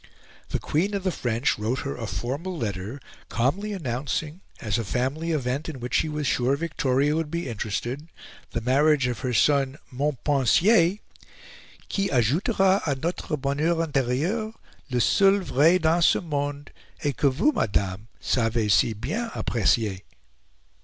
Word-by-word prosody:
The - - 0
Queen 190 +7 -1
of 195 - -3
the 185 - +1
French 120 -6 0
wrote 115 +5 -1
her 140 - -4
a 115 -2 -5
formal 145 - -4
letter, 105 +1 -4 0.3
calmly 160 - 0
announcing, 150 - -3 0.2
as 110 +1 -1
a - - -1
family 135 - -2
event 140 0 -1
in 145 -5 -7
which 125 +1 -6
she 155 - +2
was 150 -1 -3
sure 130 +1 +2
Victoria 145 -2 0
would 160 -1 -1
be 170 0 -3
interested, 120 +6 -4 0.4
the 115 - -3
marriage 140 +3 +3
of 125 -3 -2
her 130 - -2
son, 135 +3 +2
Montpensier 150 - +3 0.9
"qui 195 -1 -1
ajoutera 185 - +2
a 140 - +1
notre 155 +1 -3
bonheur 150 +5 0
interieur, 160 - -1 0.4
le 125 -1 0
seul 195 - +4
vrai 165 +1 +4
dans 165 +1 +2
ce - - +5
monde, 145 -3 -3 0.3
et 145 -1 0
que 145 -2 +3
vous, 165 - +2
madame, 100 - -1
savez 115 -3 +1
si 115 - +3
bien 225 - -3
apprecier." 105 -3 +1
140 Hz, 145 wpm, -25 LUFS, 125-165 Hz, 0.9 s, ce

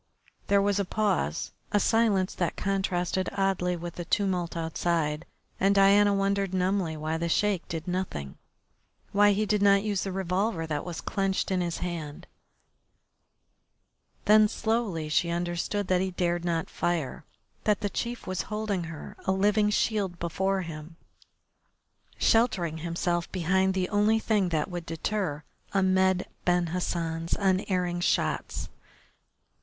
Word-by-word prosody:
There 200 0 +4
was 205 0 +1
a - - +2
pause, 195 - -1 0.2
a 205 - +3
silence 205 -3 +2
that 175 -3 -1
contrasted 190 -2 -1
oddly 190 -2 +1
with 170 0 -7
the 175 - -4
tumult 180 -3 0
outside, 160 -1 -1 0.3
and 195 +1 +3
Diana 200 +1 +6
wondered 195 -1 0
numbly 185 -3 0
why 155 +1 -2
the 170 +1 -2
Sheik 200 0 +1
did 165 0 -5
nothing, 175 - -4 0.7
why 205 0 +5
he 215 +2 0
did 210 -1 +1
not 200 0 +5
use 205 -3 -1
the 195 - -3
revolver 185 -1 -1
that 150 -2 -2
was 175 -2 -5
clenched 195 -1 -1
in 185 -1 +1
his 170 -1 -2
hand 160 -4 -5 2.0
Then 215 0 +7
slowly 215 -8 -1
she 165 +3 +1
understood 175 +3 -2
that 185 -1 +3
he 190 - 0
dared 175 -1 -1
not 165 -2 -1
fire, 165 -4 -2 0.4
that 210 -2 +2
the 205 - 0
chief 235 +4 -4
was 185 -1 -2
holding 210 -4 -2
her, 160 -2 -8
a - - +2
living 210 +2 +3
shield, 205 -4 0
before 190 +3 -1
him, 160 0 -8 1.2
sheltering 185 -9 +2
himself 170 +1 -1
behind 190 +2 +1
the 185 -1 0
only 210 +2 +3
thing 210 -4 +1
that 155 -3 0
would 175 -2 -6
deter 165 -2 -2 0.3
Ahmed 190 -1 +3 0.2
Ben 175 -1 +2
Hassan's 165 -2 -1
unerring 185 -2 0
shots. 175 - 0
185 Hz, 140 wpm, -28 LUFS, 170-200 Hz, 2.0 s, Then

